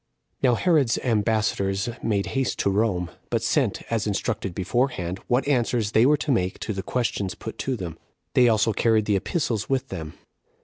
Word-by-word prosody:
1. 130 - +3
Now - - +3
Herod's 150 -6 +2
ambassadors 105 -3 +1
made 100 -3 0
haste 135 -2 0
to 100 - +1
Rome; 95 -4 0 0.2
but - - 0
sent, - - +1
as 110 -2 0
instructed 100 -2 -2
beforehand, 95 -3 -1
what 125 +3 +1
answers 120 -5 +1
they 115 +3 +5
were 150 +1 +4
to 145 - -2
make 95 -7 0
to 110 - -2
the 95 - -3
questions 105 -5 -2
put 110 - -8
to 135 - -1
them. 90 -7 -6 0.3
They 125 -1 +5
also 110 0 +2
carried 110 0 +2
the 105 - +2
epistles 110 - -1
with 135 -2 0
them. 80 -5 -6
110 Hz, 180 wpm, -25 LUFS, 95-125 Hz, 0.3 s, they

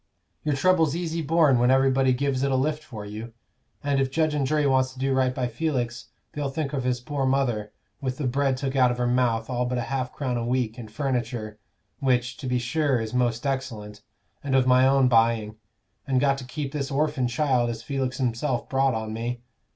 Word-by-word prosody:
Your 150 -2 0
trouble's 160 0 +3
easy 165 -1 -2
borne 155 -4 +3
when 125 +1 +3
everybody 135 0 +4
gives 130 +1 0
it 140 0 +1
a - - +2
lift 150 +3 0
for 110 -8 -8
you; 110 +3 -7 0.5
and 140 -1 +1
if 135 - 0
judge 155 +2 +1
and 140 -3 0
jury 150 +1 +1
wants 130 -1 +2
to 130 - -13
do 135 0 +1
right 130 -1 +2
by 125 -1 -1
Felix, 120 -2 -2 0.3
they'll 145 -2 -2
think 140 +1 -3
of 135 -3 -1
his 125 -1 0
poor 140 +2 -3
mother, 120 -6 0 0.3
with 130 -2 -2
the 150 - -3
bread 135 +1 +1
took 135 0 -3
out 130 -2 +5
of 120 - -2
her 125 - 0
mouth, 120 -2 +1
all 125 -1 -1
but 125 0 -1
half 130 +2 -2
a - - -25
crown 130 -4 -2
a 120 - -2
week 120 -1 -1
and 110 -3 -8
furniture 120 -4 -3 0.4
which, 125 -2 +1
to 140 - -6
be 125 0 +1
sure, 135 +1 +1
is 110 0 -4
most 120 0 0
excellent, 115 -7 -4 0.4
and 135 -2 0
of 130 -1 +4
my 130 +1 +5
own 135 -1 +4
buying 115 -2 +2 0.5
and 130 -2 +2
got 135 0 +2
to 130 - -8
keep 140 +1 -4
this 140 -2 -3
orphin 140 -2 0
child 125 -2 +1
as 115 -1 -5
Felix 130 -1 -2
himself 125 0 -1
brought 135 -2 +2
on 110 -1 -4
me. 120 +2 -4
130 Hz, 215 wpm, -25 LUFS, 120-140 Hz, 0.5 s, out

